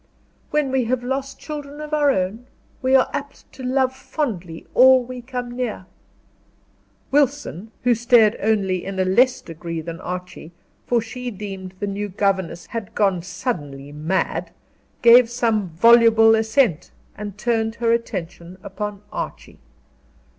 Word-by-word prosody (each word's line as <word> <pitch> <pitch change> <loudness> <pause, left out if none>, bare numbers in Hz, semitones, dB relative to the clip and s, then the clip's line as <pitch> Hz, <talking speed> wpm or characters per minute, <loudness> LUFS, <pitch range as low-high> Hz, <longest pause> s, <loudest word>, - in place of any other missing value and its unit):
"When 295 -3 0
we 260 -2 +1
have 245 +1 -1
lost 270 +2 -3
children 295 -1 -7
of 305 0 -7
our 295 -1 +3
own, 220 +1 -1 0.3
we 260 +1 +3
are 260 - +5
apt 285 0 -7
to - - -11
love 260 0 +1
fondly 195 - -4
all 260 0 +7
we 250 0 -8
come 245 -1 -5
near." 240 -6 -3 1.3
Wilson, 275 - 0
who 245 0 +4
stared 235 -2 +4
only 195 -4 +1
in 195 0 -5
a 185 - +2
less 250 +8 +3
degree 165 0 -6
than 165 +1 -7
Archie, 180 -2 -7 0.3
for 240 -1 +2
she 250 +2 -6
deemed 195 -3 -7
the - - -1
new 205 +1 -3
governess 190 -3 -1
had 225 -1 -7
gone 195 -4 +2
suddenly 165 - -5
mad, 155 +6 -2 0.5
gave 235 0 +8
some 225 -5 0
voluble 225 +4 +6
assent, 220 - +2 0.3
and 205 -1 -7
turned 225 0 0
her 235 -1 +1
attention 180 -6 -3
upon 205 0 -6
Archie. - - -6
225 Hz, 140 wpm, -22 LUFS, 185-250 Hz, 1.3 s, gave